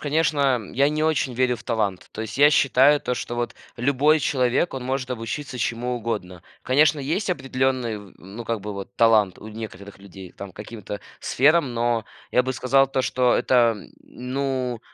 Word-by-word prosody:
конечно, 145 -6 +1
я 140 +2 +3
не 155 +1 -1
очень 140 -5 0
верю 125 0 +2
в - - -14
талант, 105 -5 -2
то 110 - -5
есть 110 +3 -7
я 145 +1 +8
считаю 140 0 +4
то, 125 - -3
что 120 - -5
вот 120 0 -3 0.2
любой 140 +5 +3
человек, 130 +4 +1
он 130 -2 -5
может 130 0 -2
обучиться 125 +3 -5
чему 120 +1 -2
угодно. 100 -7 -5 0.2
Конечно, 150 +3 +3
есть 165 +10 -2
определенный 130 - -1
в 100 -2 -13
ну, 100 +6 -10
как 115 -4 -2
бы 105 0 -5
вот 100 -1 -8
талант 110 -5 +4
у 110 - -10
некоторых 100 -3 -9
людей 95 -2 -12
там 100 -2 -9
к - - -39
каким-то 105 -1 -7 0.2
сферам. 145 -2 +2
Но 115 -1 0 0.2
я 125 - +3
бы 130 +1 -3
сказал 135 +2 +3
то, 130 0 -1
что 125 -1 +2
это, 120 -3 +3 0.3
ну 130 -2 -3
125 Hz, 180 wpm, -23 LUFS, 110-135 Hz, 0.3 s, я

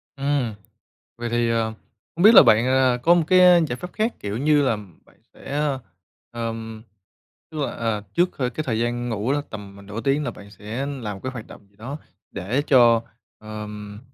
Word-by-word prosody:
Ừm. 140 -5 -1 0.6
Vậy 120 0 -4
thì, 120 0 +1
à, 115 -1 +1 0.5
hông 175 - -1
biết 220 +3 +8
là - - +11
bạn, 110 +3 +4
à, 130 -1 +3
có 170 +1 +6
một 170 - +3
cái 185 +2 +5 0.3
giải 125 - -3
pháp 180 +4 -8
khác, 220 +2 -1
kiểu 105 +1 -4
như 145 +1 +3
là 120 -5 +1 0.3
bạn - - -25 0.2
sẽ, - - -12
ơ, 145 -2 -1 0.5
ờm, 115 -1 -5 0.7
tức 155 - -7
là, 140 - -1
à, 115 -2 -2
trước 175 +1 +3
c - - -29
cái 130 +4 -2
thời 115 -3 -1
gian 120 +1 -1
ngủ 110 +4 -1
đó, 145 0 0
tầm 100 -2 -9
m - - -16
nửa 105 +2 -5
tiếng 140 +3 0
là 125 - -2
bạn 100 -2 -13
sẽ 110 +7 -5
làm 120 -8 -5
một - - -12
cái 130 - -3
hoạt 120 -4 -8
động 100 - -15
gì 100 - -31
đó 130 +7 -6 0.3
để 105 +9 -2
cho, 120 -4 +5 0.4
ờm, 105 -1 -8
120 Hz, 210 wpm, -23 LUFS, 110-140 Hz, 0.7 s, là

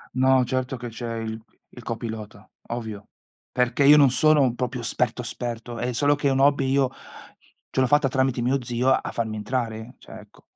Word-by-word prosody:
No, 130 0 +4
certo 130 +1 -2
che 120 0 -6
c'è 115 0 -5
il 110 0 -5 0.3
il 125 - -10
copilota, 110 -3 -6 0.2
ovvio. 110 -4 -6 0.4
Perché, 125 +2 +1
io 145 +2 +8
non 140 -4 +6
sono 145 -4 +3
proprio 125 0 -3
esperto 115 - -1
esperto, 120 -1 -6
è 125 - -1
solo 145 +4 +2
che 145 -1 -1
è - - +3
un 135 - +1
hobby, 140 -1 +3
io 135 -1 +2 0.8
ce 130 - +1
l'ho 130 - +3
fatta 145 +1 +3
tramite 130 -1 0
mio 130 +1 0
zio 120 +2 0
a - - 0
farmi 110 -2 -3
entrare, 115 +1 -4
cioè, - - -12
ecco. - - -18
125 Hz, 190 wpm, -24 LUFS, 115-135 Hz, 0.8 s, io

